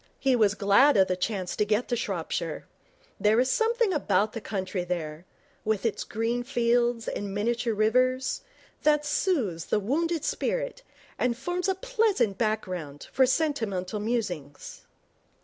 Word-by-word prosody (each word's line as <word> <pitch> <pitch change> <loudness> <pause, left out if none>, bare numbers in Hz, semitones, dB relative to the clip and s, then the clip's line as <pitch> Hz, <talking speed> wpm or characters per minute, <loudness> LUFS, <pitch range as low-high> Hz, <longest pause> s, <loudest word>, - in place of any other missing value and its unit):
He 265 -2 +2
was 210 -4 +3
glad 200 +8 +5
of 190 -1 +5
the 185 - 0
chance 185 -1 -2
to - - +2
get 210 +3 0
to 240 - +1
Shropshire. 235 - -3 0.5
There 215 +2 +4
is 260 +1 +2
something 460 -2 +2
about 210 - +1
the 225 - -5
country 185 -3 -3
there, 170 -1 -4 0.4
with 215 0 -1
its 230 - 0
green 230 +2 -1
fields 240 -2 +1
and 200 -1 -4
miniature 235 +2 0
rivers, 255 +4 +2 0.4
that 300 -1 +3
soothes 255 - 0
the - - +1
wounded 315 - -1
spirit - - -2 0.4
and 240 -2 +1
forms 355 +7 -2
a 380 - +1
pleasant 410 - +1
background 185 -10 -3
for 260 -1 +4
sentimental 225 - -1
musings. 190 - -4
230 Hz, 145 wpm, -27 LUFS, 200-275 Hz, 0.5 s, glad